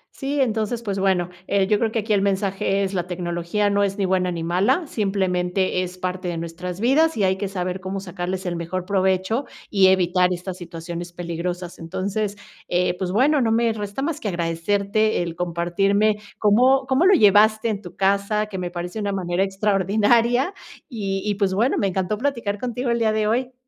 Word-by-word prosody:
Sí, 280 +1 -2
entonces 225 -2 0
pues 200 -3 -2
bueno, 185 -2 +1 0.2
eh, 200 -1 +2
yo 210 +1 +2
creo 225 -2 0
que 230 - -2
aquí 215 +1 -1
el 200 - +3
mensaje 195 0 0
es 195 0 -2
la 180 -2 -2
tecnología 175 +3 -1
no 200 0 +2
es 195 0 -1
ni 200 - 0
buena, 185 -1 +1
ni 170 -1 -4
mala. 200 - +1
Simplemente, 190 -5 0
es 180 0 -5
parte 185 0 -3
de 170 -1 -2
nuestras 170 +2 -6
vidas 300 +8 +3
y 205 - +1
hay 190 0 +3
que 200 +1 -3
saber 185 -1 -3
cómo 190 +1 -4
sacarles 185 0 -4
el 175 -1 -2
mejor 170 +2 -4
provecho, 190 +5 +1 0.3
y 195 -2 +5
evitar 180 -1 +3
estas 180 +1 -4
situaciones 175 0 -7
peligrosas. 175 +1 -5
Entonces, 200 +5 -3 0.3
eh, 180 0 +1
pues 185 -1 -2
bueno 275 +7 +3
no 225 -2 +2
me 230 0 +2
resta 210 +4 -4
más 310 0 -2
que 220 - -4
agradecerte 200 +4 0
el 170 -1 -5
compartirme 190 +5 +1 0.2
cómo 255 +6 +4
cómo 265 +7 +3
lo 390 - +7
llevaste 215 - +5
en 205 -2 -2
tu 175 -4 -11
casa, 200 +2 +1
que 200 -3 -6
me 180 -1 -3
parece 175 +4 -5
una 205 -1 -1
manera 180 -1 0
extraordinaria, 210 - +2 0.4
y 195 -6 -3
y 210 -1 0
pues, 195 -2 0
bueno, 235 +7 +2
me 200 - +1
encantó 190 +2 -1
platicar 235 -7 -2
contigo 245 +1 -2
el 235 - +1
día 220 -1 +2
de 215 0 +1
hoy. 250 +4 0
195 Hz, 195 wpm, -22 LUFS, 180-215 Hz, 0.4 s, lo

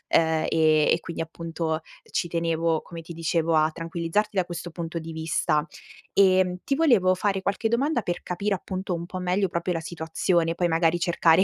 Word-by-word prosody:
uhm, 160 -1 +3
e 155 -1 +4
e - - +4
quindi 165 -1 -5
appunto, 165 -1 -3 0.3
ci 175 - 0
tenevo, 165 -1 0
come 165 -1 -9
ti 170 +1 -9
dicevo 165 0 0
a 155 0 +4
tranquillizzarti 170 +6 -2
da 180 - +3
questo 175 -1 -6
punto 165 0 -4
di 165 0 -7
vista. 160 -1 0 0.5
Ehm, 185 -2 +4
ti 275 - 0
volevo 235 - +4
fare 195 0 0
qualche 200 +3 0
domanda, 260 +2 +1
per 175 -3 -3
capire 195 +3 -1
appunto 185 0 -4
un 170 0 -3
po' 185 +1 -6
meglio 185 +2 +1
proprio 170 +1 -2
la 165 - -1
situazione, 165 +1 0
poi 175 - +1
magari 165 +1 +2
cercare 170 +1 +4
170 Hz, 185 wpm, -25 LUFS, 165-185 Hz, 0.5 s, e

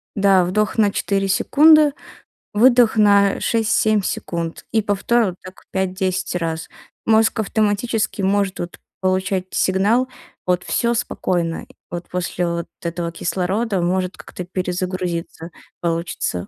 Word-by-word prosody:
да 195 -2 +4
вдох 210 +5 0
на 210 -2 +4
4 195 0 0
секунды, 300 +8 +5 0.6
выдох 240 +1 +5
на 200 -2 +4
6-7 220 -1 +2
секунд 170 -3 -4
и 220 - +2
повтор 215 +3 +1
вот 185 -3 -3
так 185 0 -13
5-10 185 -1 -1
раз. 165 -2 -3 0.4
Мозг 220 0 +3
автоматически 215 +1 0
может, 195 0 0
вот, 175 0 -6 0.2
получать 185 0 0
сигнал: 205 +7 +2 0.6
"Всё 235 0 +1
спокойно". 175 -6 -2 0.3
Вот, 175 0 -5
после 180 0 -2
вот 170 0 -3 0.2
этого 170 0 -3
кислорода 190 +4 -1
может 185 +1 -1
как-то 180 - -8
перезагрузиться 180 -2 -3 0.3
получится. 165 - -2
190 Hz, 115 wpm, -20 LUFS, 180-215 Hz, 0.6 s, секунды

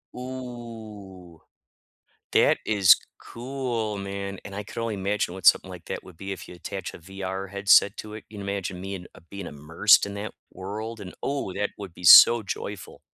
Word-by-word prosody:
Ooh. 115 -8 -9 0.9
That - - +4
is 100 -4 +6 0.3
cool, 120 -4 -4
man, 100 0 -5
and 100 - -9
I 105 - -4
could 105 - -10
only 115 -1 -2
imagine 100 -2 -1
what 95 -3 -6
something - - +6
like 90 -2 -11
that - - -5
would 90 - -14
be 95 +3 -7
if 95 -3 -6
you - - -11
attach 90 +1 -6
a - - -9
VR 95 +2 -6
headset 100 +1 +4
to 105 0 -7
it. 110 - -9
You 105 -1 -10
imagine 100 -2 -4
me, 95 +1 -5
and, 90 -2 -8
uh, - - -15
being 100 -2 -7
immersed 80 +9 +3
in 100 - -7
that 100 +1 -6 0.2
world, 110 +4 -6
and, 90 -2 -8
oh, 140 -9 -2
that 105 +1 -1
would 100 -4 -8
be 90 - -13
so 115 +6 +10
joyful. 100 -3 -6
100 Hz, 185 wpm, -25 LUFS, 95-110 Hz, 0.9 s, so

